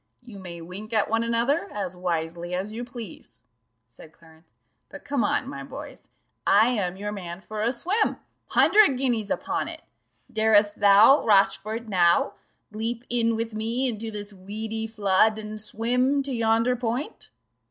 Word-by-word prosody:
"You 225 Hz, -5 st, -11 dB
may 170 Hz, -3 st, -9 dB
wink 195 Hz, +7 st, -8 dB
at 215 Hz, -1 st, +1 dB
one 225 Hz, 0 st, +2 dB
another, 230 Hz, -1 st, 0 dB
as 190 Hz, -3 st, -4 dB
wisely 175 Hz, 0 st, -3 dB
as 190 Hz, +3 st, -4 dB
you 230 Hz, +3 st, -5 dB
please," 240 Hz, -6 st, -10 dB, 0.5 s
said 120 Hz, +6 st, -15 dB
Clarence, 160 Hz, 0 st, -21 dB, 0.3 s
"but -, -, -12 dB
come 280 Hz, -5 st, 0 dB
on, 205 Hz, -, 0 dB
my 140 Hz, 0 st, -7 dB
boys -, -, -10 dB, 0.4 s
I 220 Hz, +4 st, +5 dB
am 190 Hz, -7 st, -2 dB
your 205 Hz, +1 st, -4 dB
man 180 Hz, -3 st, -7 dB
for 215 Hz, +1 st, -6 dB
a 230 Hz, +2 st, +2 dB
swim 370 Hz, -, 0 dB, 0.3 s
hundred 375 Hz, -7 st, +5 dB
guineas 240 Hz, -6 st, -1 dB
upon -, -, -2 dB
it! -, -, -8 dB, 0.5 s
'Darest 215 Hz, -1 st, +3 dB
thou, 205 Hz, +7 st, +6 dB
Rochfort, 215 Hz, +2 st, +2 dB
now 175 Hz, -4 st, +3 dB, 0.4 s
Leap 225 Hz, +2 st, -4 dB
in 230 Hz, -1 st, +2 dB
with 225 Hz, 0 st, -3 dB
me 230 Hz, +4 st, -1 dB
into 225 Hz, -2 st, -4 dB
this 205 Hz, -1 st, -7 dB
weedy 220 Hz, +3 st, -3 dB
flood, 215 Hz, 0 st, +2 dB
And 215 Hz, 0 st, -6 dB
swim 250 Hz, +6 st, +1 dB
to 275 Hz, -1 st, -4 dB
yonder 230 Hz, +1 st, +2 dB
point? 245 Hz, +3 st, -4 dB
215 Hz, 155 wpm, -25 LUFS, 195-235 Hz, 0.5 s, thou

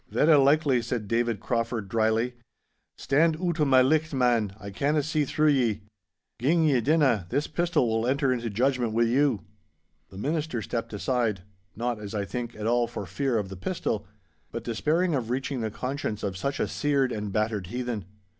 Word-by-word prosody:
'Verra 150 Hz, -1 st, +5 dB
likely,' 140 Hz, -3 st, +3 dB
said 115 Hz, -2 st, -3 dB
David 115 Hz, -1 st, 0 dB
Crauford, 115 Hz, -2 st, -2 dB
drily. 110 Hz, +3 st, +1 dB, 0.6 s
'Stand 155 Hz, +4 st, +2 dB
oot 170 Hz, -2 st, -1 dB
o' 150 Hz, -, +4 dB
my 130 Hz, -2 st, +5 dB
licht, 155 Hz, +2 st, +1 dB
man, 120 Hz, -6 st, +2 dB
I 100 Hz, -, -8 dB
canna 145 Hz, +8 st, +1 dB
see 155 Hz, 0 st, 0 dB
through 155 Hz, +3 st, +2 dB
ye. 120 Hz, -7 st, +2 dB, 0.6 s
Gin 160 Hz, +7 st, +3 dB
ye 140 Hz, -6 st, +3 dB
dinna, 130 Hz, -, +2 dB
this 145 Hz, +7 st, 0 dB
pistol 170 Hz, -7 st, +1 dB
will 115 Hz, +1 st, 0 dB
enter 135 Hz, 0 st, +2 dB
into 120 Hz, -2 st, -3 dB
judgment 120 Hz, +1 st, 0 dB
wi' 115 Hz, +1 st, +3 dB
you.' 125 Hz, -1 st, +2 dB, 0.7 s
The 95 Hz, -, -12 dB
Minister 150 Hz, 0 st, -2 dB
stepped 115 Hz, +1 st, -4 dB
aside—not, 105 Hz, 0 st, -3 dB
as 105 Hz, 0 st, -7 dB
I 100 Hz, -1 st, -1 dB
think, 120 Hz, +2 st, -5 dB
at 105 Hz, -, -6 dB
all 120 Hz, +1 st, +2 dB
for 105 Hz, -, -6 dB
fear 125 Hz, +7 st, -1 dB
of 100 Hz, -3 st, -2 dB
the 95 Hz, -, -7 dB
pistol, 95 Hz, -, -3 dB, 0.4 s
but -, -, -5 dB
despairing 155 Hz, +9 st, 0 dB
of 125 Hz, -5 st, -1 dB
reaching 130 Hz, 0 st, -2 dB
the 110 Hz, -, -1 dB
conscience 125 Hz, -1 st, -4 dB
of 100 Hz, -2 st, -2 dB
such 140 Hz, +9 st, -3 dB
a -, -, +1 dB
seared 140 Hz, -3 st, +1 dB
and 105 Hz, -2 st, -4 dB
battered 105 Hz, -2 st, -1 dB
heathen. 120 Hz, -2 st, -4 dB
120 Hz, 180 wpm, -27 LUFS, 110-140 Hz, 0.7 s, Verra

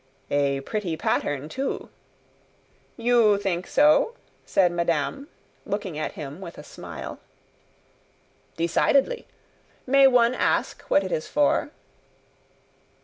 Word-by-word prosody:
"A 140 Hz, -1 st, +1 dB
pretty 180 Hz, 0 st, -3 dB
pattern 145 Hz, -1 st, -1 dB
too!" 265 Hz, -, -4 dB, 1.1 s
"You 230 Hz, -3 st, +4 dB
think 185 Hz, -3 st, -2 dB
so?" 300 Hz, +10 st, +4 dB, 0.3 s
said 180 Hz, -3 st, +3 dB
madame, 170 Hz, -, -1 dB, 0.4 s
looking 200 Hz, -5 st, -4 dB
at 155 Hz, -, -3 dB
him 150 Hz, +3 st, -8 dB
with 170 Hz, -3 st, -9 dB
a -, -, -9 dB
smile. -, -, -8 dB, 1.4 s
"Decidedly. 270 Hz, -, +1 dB, 0.6 s
May 275 Hz, +1 st, +6 dB
one 245 Hz, -2 st, +4 dB
ask -, -, 0 dB
what 195 Hz, -, +4 dB
it 190 Hz, -, -5 dB
is 155 Hz, -, -2 dB
for?" 290 Hz, 0 st, +1 dB
195 Hz, 105 wpm, -25 LUFS, 160-255 Hz, 1.4 s, May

